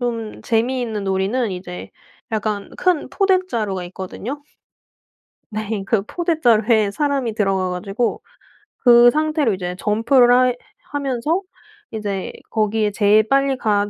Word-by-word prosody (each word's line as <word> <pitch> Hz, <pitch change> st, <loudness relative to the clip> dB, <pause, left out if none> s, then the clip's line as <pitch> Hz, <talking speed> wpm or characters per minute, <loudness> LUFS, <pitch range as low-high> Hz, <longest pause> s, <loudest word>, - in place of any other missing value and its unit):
좀 230 Hz, -3 st, -4 dB
재미있는 230 Hz, -2 st, -1 dB
놀이는 195 Hz, +5 st, 0 dB
이제 180 Hz, 0 st, -8 dB, 0.4 s
약간 210 Hz, -2 st, -2 dB
큰 360 Hz, -5 st, +1 dB
포대 390 Hz, -2 st, +3 dB
자루가 200 Hz, -6 st, -2 dB
있거든요. 200 Hz, +10 st, -7 dB, 1.1 s
네. 215 Hz, -1 st, -3 dB
그 210 Hz, -3 st, +1 dB
포대 335 Hz, -, -2 dB
자루에 220 Hz, -3 st, +3 dB
사람이 275 Hz, -2 st, -1 dB
들어가 195 Hz, -4 st, 0 dB
가지고 195 Hz, +6 st, -2 dB, 0.6 s
그 240 Hz, -1 st, +7 dB
상태로 305 Hz, -6 st, +1 dB
이제 180 Hz, -1 st, -4 dB
점프를 245 Hz, +4 st, +4 dB
해 245 Hz, -, -2 dB, 0.4 s
하면서 285 Hz, +5 st, -1 dB, 0.5 s
이제 205 Hz, -4 st, -4 dB, 0.2 s
거기에 215 Hz, -1 st, 0 dB
제일 210 Hz, +1 st, +3 dB
빨리 275 Hz, 0 st, +2 dB
갔 205 Hz, -3 st, +1 dB
225 Hz, 265 characters per minute, -20 LUFS, 205-255 Hz, 1.1 s, 그